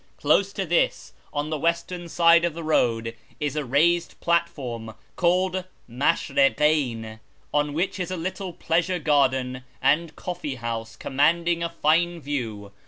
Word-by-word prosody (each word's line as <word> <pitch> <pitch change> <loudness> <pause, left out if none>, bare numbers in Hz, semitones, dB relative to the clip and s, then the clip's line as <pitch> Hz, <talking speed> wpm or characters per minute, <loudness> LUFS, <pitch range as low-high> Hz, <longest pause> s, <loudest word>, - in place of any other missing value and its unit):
Close 200 0 +2
to 195 - -3
this, 170 0 0 0.2
on 145 +1 -3
the 155 - -1
western 170 +2 -1
side 170 0 +5
of 170 -2 0
the 165 - -6
road, 115 -7 +1 0.2
is 150 -1 -2
a 150 - -1
raised 165 +7 +1
platform 135 -10 -1 0.2
called 185 +1 +1 0.2
Maslirikcyn, 135 -2 +1 0.3
on 145 0 +1
which 180 +5 -1
is 180 - -2
a 185 - -3
little 185 +2 -4
pleasure 170 +2 0
garden 130 -5 +1 0.2
and 155 +4 +1
coffee 175 -6 -5
house 115 -2 -5
commanding 170 +5 +1
a 170 - -1
fine 170 +1 +1
view. 115 -9 -4
155 Hz, 140 wpm, -25 LUFS, 130-170 Hz, 0.3 s, side